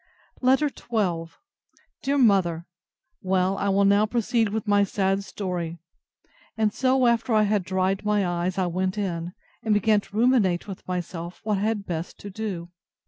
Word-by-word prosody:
LETTER 265 +4 +3
XII 180 -11 -2 0.7
DEAR 280 +1 0
MOTHER, 190 -9 +3 0.6
Well, 185 0 +1
I 200 - 0
will 200 +1 +3
now 200 +2 +4
proceed 230 -1 +1
with 220 +1 -3
my 205 0 +4
sad 195 0 0
story. 180 -4 -4 0.8
And 215 -2 +1
so, 260 0 +2
after 235 -1 +2
I 215 - +5
had 205 -2 +1
dried 190 +2 0
my 210 -2 +1
eyes, 175 +1 -1
I 190 - +2
went 185 +3 -1
in, 175 -3 -3 0.3
and 220 -3 +1
began 210 0 +3
to 200 +1 -10
ruminate 220 -8 +3
with 195 -2 -9
myself 175 -1 -5
what 210 -2 0
I - - -3
had 210 -1 -1
best 170 -1 -5
to 200 - -8
do. 185 -5 -5
200 Hz, 165 wpm, -25 LUFS, 180-220 Hz, 0.8 s, I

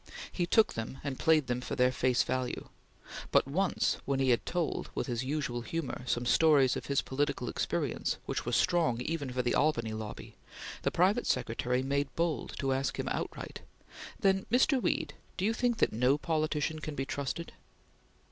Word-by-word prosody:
He 175 -2 -1
took 220 +4 +4
them 115 +4 -5
and 140 -2 -4
played 160 -3 +4
them 125 0 -2
for - - -4
their 125 0 +4
face 130 -1 +2
value; 130 -1 -3 0.6
but - - +4
once, 180 +7 +1
when 135 -1 -1
he 135 -1 +3
had 120 - +1
told, 170 -4 -1
with - - -1
his 120 -1 -2
usual 130 -3 -2
humor, 165 +2 -4
some 120 0 0
stories 140 -1 +5
of - - -5
his 140 -1 +1
political 140 -2 -1
experience - - -1
which - - -2
were - - -3
strong 160 -9 +2
even 145 -2 -2
for 125 0 -1
the 120 - +1
Albany 115 -8 +1
lobby, 110 -1 -7 0.5
the - - +1
private 195 +7 +2
secretary 125 +1 0
made 140 +1 0
bold 165 -2 -1
to 135 -1 0
ask 135 +1 -1
him - - -2
outright: - - -4 0.6
"Then, 190 -1 +2
Mr. 260 +2 +4
Weed, - - 0 0.2
do 190 - 0
you 220 - +2
think 240 0 +1
that - - +2
no 125 +5 +3
politician 155 0 -1
can 155 -1 -5
be 135 - -2
trusted?" 140 +4 -4
140 Hz, 180 wpm, -31 LUFS, 125-165 Hz, 0.6 s, stories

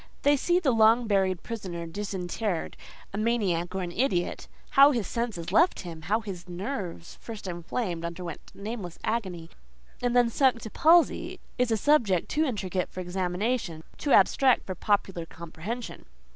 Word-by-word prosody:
They 285 +1 +5
see 350 +6 +2
the 300 -7 +2
long 225 +1 +5
buried 190 -4 +1
prisoner 185 -7 -5
disinterred, 190 +1 -3 0.4
a 200 - -2
maniac 195 -6 0
or 190 - -1
an 175 - -4
idiot!—how 260 +6 +2
his 240 -8 0
senses 225 -8 -3
left 345 +2 +4
him—how 175 +5 -2
his 185 -4 -8
nerves, 180 -2 -5
first 220 -4 -8
inflamed, 175 +1 -3
underwent 170 -1 -5
nameless 200 -4 -6
agony, 190 -7 -3 0.5
and 245 0 0
then 240 -1 +4
sunk 260 -1 +3
to 220 - -7
palsy—is 315 -6 +2
a 225 - +2
subject 215 - +2
too 310 +1 +1
intricate 190 - -2
for - - -8
examination, 180 0 -2
too 285 - -2
abstract 265 -2 +5
for 190 - -4
popular 190 -3 0
comprehension. 170 +10 -7
200 Hz, 145 wpm, -27 LUFS, 175-240 Hz, 0.5 s, They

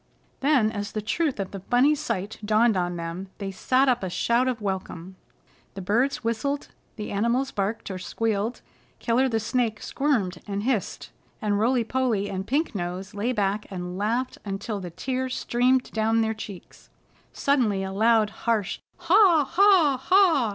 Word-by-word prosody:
Then 265 -6 +3
as 205 -1 -5
the 215 - -2
truth 285 +3 -1
of 195 -1 -3
the 195 - -6
funny 245 +9 +3
sight 220 -9 -3
dawned 215 +1 +3
upon 175 -1 -1
them, 170 +3 -5
they 195 -1 -4
sat 255 +7 +2
up 250 -2 +2
a 190 - -3
shout 235 +8 +1
of 250 -2 -1
welcome. 190 -3 -5 0.6
The 195 - -5
birds 250 +6 +1
whistled; 280 +5 -2 0.3
the 210 -2 -6
animals 235 +6 0
barked 200 +1 -3
or 185 - -5
squealed; 220 +4 -2 0.3
Killer 250 +3 +1
the 225 -2 0
Snake 225 -1 -1
squirmed 220 -12 -1
and 200 0 -3
hissed, 235 -5 -2 0.3
and 205 -3 0
Rolly 240 +2 +2
Polly 225 -4 -1
and 190 0 -4
Pink 300 +6 0
Nose 185 +1 -4
lay 210 +5 -1
back 205 -2 -1
and 180 -2 -5
laughed 230 +6 -1
until 200 +1 -4
the 180 -2 -6
tears 255 +9 -3
streamed 250 +2 +1
down 225 +1 +1
their 220 0 0
cheeks. 210 -4 -10 0.4
Suddenly 235 -9 +1
a 190 - -4
loud, 220 +1 +3 0.2
harsh 215 -5 0 0.2
"Ha! 350 -5 +5
Ha! 355 -9 +5
Ha!" 340 - +4
220 Hz, 165 wpm, -25 LUFS, 195-255 Hz, 0.6 s, Ha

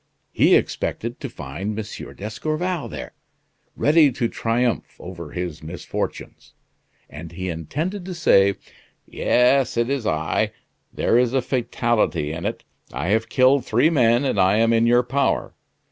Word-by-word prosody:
He - - +4
expected - - -2
to - - -5
find 95 +11 -6
M. 110 -1 -7
d'Escorval 155 - -3
there, - - -8 0.6
ready 150 -1 +4
to 120 - 0
triumph 115 -1 -1
over 85 -3 -8
his 90 -1 -5
misfortunes; 80 +3 -6 0.5
and 80 +3 -10
he 95 +1 -4
intended 150 - -4
to 185 -1 -6
say: 100 -12 +4 0.5
'Yes, 125 0 +2
it's 120 0 0
I. 80 0 0 0.4
There 115 - +2
is 125 +1 +1
a 135 - +3
fatality 120 - 0
in 80 +2 -3
it. - - -5 0.3
I 70 +8 -3
have 110 +2 +1
killed 130 0 +4
three 125 +9 +2
men, 120 -3 +3
and 135 - 0
I 95 +3 +4
am 115 +1 +3
in 115 0 +3
your 120 +1 +4
power. 135 +3 0
115 Hz, 145 wpm, -22 LUFS, 95-135 Hz, 0.6 s, He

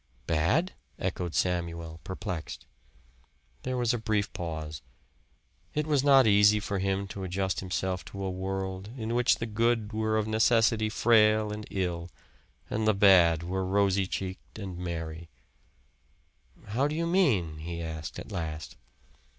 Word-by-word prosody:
"Bad?" 85 - +1 0.2
echoed 90 -2 -3
Samuel 85 -2 -1
perplexed. 95 -2 -5 1.0
There 130 0 -3
was 120 -1 +1
a 120 - -1
brief 105 -2 -1
pause. 80 -3 -5 0.9
It 150 0 0
was 145 -3 +2
not 135 -2 +6
easy 105 0 +6
for 100 -2 -3
him 95 +1 -1
to 95 - -6
adjust 95 +1 -1
himself 95 0 -2
to 100 0 -7
a 95 - -2
world 95 +1 -4
in 115 -1 -3
which 120 0 +4
the 115 - -4
good 115 0 0
were 110 0 0
of 110 0 0
necessity 110 0 +3
frail 110 -2 +4
and 105 0 -7
ill, 90 -2 -2 0.6
and 110 0 -1
the 110 - +4
bad 90 -5 +6
were 95 +2 -2
rosy 100 0 +2
cheeked 95 +1 -6
and 95 -4 -6
merry. 85 -2 -5 1.4
"How 130 +7 +1
do 150 - -3
you 165 +1 0
mean?" 120 - +2
he 85 +2 -5
asked 80 -2 -5
at - - -8
last. 80 -2 -5
95 Hz, 145 wpm, -29 LUFS, 85-110 Hz, 1.4 s, not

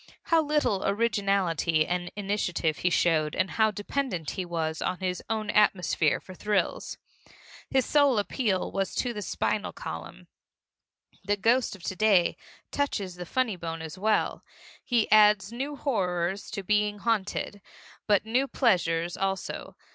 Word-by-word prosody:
How 330 -1 +3
little 295 -10 +1
originality 195 -7 +1
and 175 0 -2
initiative 195 -6 -1
he 180 - +2
showed 160 -3 +2
and 185 +1 0
how 220 -1 +3
dependent 205 - -3
he 185 - -4
was 160 -2 -3
on 180 - -1
his 180 -1 -3
own 215 -1 -1
atmosphere 180 -7 +2
for 185 - -12
thrills! 210 +1 -1 0.7
His 265 -1 +2
sole 285 -5 +4
appeal 205 -2 0
was 195 -1 -2
to 245 -2 -1
the 210 - -5
spinal - - -1
column. - - -8 1.0
The 205 +2 0
ghost 230 +3 +2
of 185 - -16
to 185 - -3
day 200 -4 +3 0.4
touches 210 -10 -1
the 180 0 -8
funny 255 -3 0
bone 165 -1 -5
as 160 0 -7
well. 215 +3 0 0.4
He 235 -3 +1
adds 210 -1 +5
new 270 +5 -4
horrors 190 - -1
to 205 -2 -5
being 210 +1 +1
haunted, 205 -1 -2 0.5
but 205 0 +3
new 250 +5 +1
pleasures 175 - +1
also. 195 0 -3
200 Hz, 145 wpm, -27 LUFS, 180-220 Hz, 1.0 s, adds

